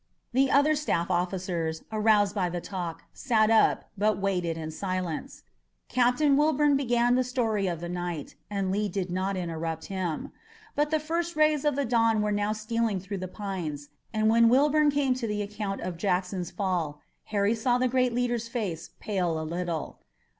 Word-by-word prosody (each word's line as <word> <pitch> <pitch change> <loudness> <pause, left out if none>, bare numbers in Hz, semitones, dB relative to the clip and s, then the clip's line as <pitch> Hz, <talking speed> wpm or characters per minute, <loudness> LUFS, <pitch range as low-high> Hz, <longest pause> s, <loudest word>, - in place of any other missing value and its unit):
The 270 +2 +3
other 285 +3 +4
staff 185 - -1
officers, 175 -2 -1
aroused 210 -2 +3
by 190 -4 0
the 175 0 -3
talk, 175 -2 -5
sat 225 -4 +2
up, 225 - +3
but 210 0 +2
waited 180 -4 -1
in 160 -1 -5
silence. 185 -1 -4 0.5
Captain 255 +4 +3
Wilbourn 295 0 +3
began 245 -3 +2
the 255 +1 +3
story 225 -6 0
of 170 -2 -3
the 175 - -4
night, 175 -4 -4 0.2
and 195 -2 -1
Lee 205 +1 0
did 185 -1 -3
not 190 +2 -1
interrupt 165 -2 -3
him. 180 -5 -3 0.4
But 295 +1 +1
the 310 0 +2
first 335 +2 -2
rays 305 -2 +3
of 295 -2 +2
the 280 0 0
dawn 230 -2 +3
were 210 - 0
now 205 0 0
stealing 215 -1 -1
through 195 +1 -5
the 185 - -4
pines, 175 -8 -5 0.2
and 215 -1 +1
when 230 +1 +5
Wilbourn 295 +4 +4
came 280 -2 +2
to 250 -2 -3
the 210 -1 -1
account 205 -1 -4
of 180 -2 -4
Jackson's 180 -1 -1
fall, 175 -7 -2 0.3
Harry 205 0 +1
saw 245 +2 +1
the 255 +1 +2
great 250 0 +2
leader's 240 -1 -1
face 205 -9 -4
pale 180 -6 -1
a 160 - -4
little. 170 -1 -4
205 Hz, 175 wpm, -28 LUFS, 180-245 Hz, 0.5 s, when